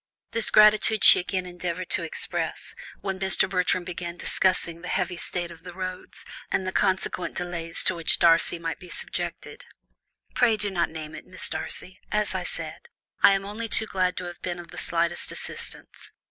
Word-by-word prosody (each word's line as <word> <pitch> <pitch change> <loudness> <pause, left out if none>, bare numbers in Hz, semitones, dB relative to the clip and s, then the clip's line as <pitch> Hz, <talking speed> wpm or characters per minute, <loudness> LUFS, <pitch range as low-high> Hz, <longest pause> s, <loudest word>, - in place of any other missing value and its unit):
This 230 -1 +2
gratitude 215 0 +5
she - - +10
again 185 0 -3
endeavoured 180 0 -5
to - - +2
express, 165 - -3 0.3
when 190 -1 -3
Mr. 190 0 +5
Bertram 180 -1 0
began 175 -1 -6
discussing 175 -3 0
the 180 - -7
heavy 180 - -1
state 175 0 -3
of 165 - -13
the 180 0 -10
roads, 185 -1 -7 0.3
and 190 - 0
the 185 - -2
consequent 190 -2 0
delays 170 -2 -2
to - - +2
which 165 -2 +2
Darcy 170 0 +4
might 165 -2 -4
be 180 - -12
subjected. - - -5 0.7
"Pray 230 -3 +3
do 205 -1 0
not 170 -2 0
name 155 -1 -8
it, 155 - -10
Miss 185 - -5
Darcy; 185 +1 -6
as 210 0 0
I - - -2
said, - - -7 0.3
I 200 - +7
am 195 0 -1
only 215 +3 -5
too 220 - +5
glad 185 -3 -1
to - - -3
have 175 0 -9
been 175 -1 -3
of 175 -1 -10
the - - -7
slightest 170 0 0
assistance. - - -7
180 Hz, 185 wpm, -26 LUFS, 170-190 Hz, 0.7 s, she